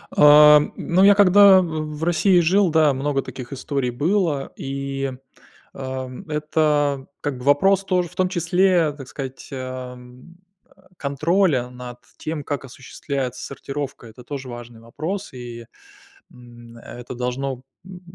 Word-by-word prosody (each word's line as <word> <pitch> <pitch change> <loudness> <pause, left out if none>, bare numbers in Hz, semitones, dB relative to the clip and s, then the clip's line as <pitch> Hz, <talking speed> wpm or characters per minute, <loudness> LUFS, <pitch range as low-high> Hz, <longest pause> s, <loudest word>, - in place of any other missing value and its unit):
А, 150 0 +8
м, 150 - -4
ну, 180 +3 +1
я 200 0 +7
когда 200 -1 +7
в 155 -3 -4
в 160 - -6
России 175 +2 +3
жил, 185 +3 +3
да, 155 -2 +3
много 135 +1 -1
таких 130 -1 -9
историй 140 -1 -2
было. 155 +1 -1
И, 135 0 -4 0.6
ам, 130 +4 -7
это 150 -2 0
как 145 -3 -3
бы 125 - -10
вопрос 195 +8 +3
тоже, 180 -2 0
в 180 - -19
том 185 - +1
числе, 175 -1 +2
так 135 -3 -10
сказать, 135 -1 -8
а, 130 -1 -6
м, 125 +7 -16 0.4
э, 190 - -25 0.2
контроля 145 -2 0
над 125 -1 -10 0.2
тем, 155 -2 -5
как 145 -1 -4
осуществляется 130 -1 -6
сортировка. 140 -2 -6
Это 115 +3 -14
тоже 135 0 -7
важный 120 -1 -10
вопрос, 160 - -5
и, 120 -2 -9 0.7
м, 120 -1 -15
это 120 +2 -10
должно 125 +1 -4 0.2
м, 185 -1 -11
140 Hz, 145 wpm, -22 LUFS, 125-170 Hz, 0.7 s, А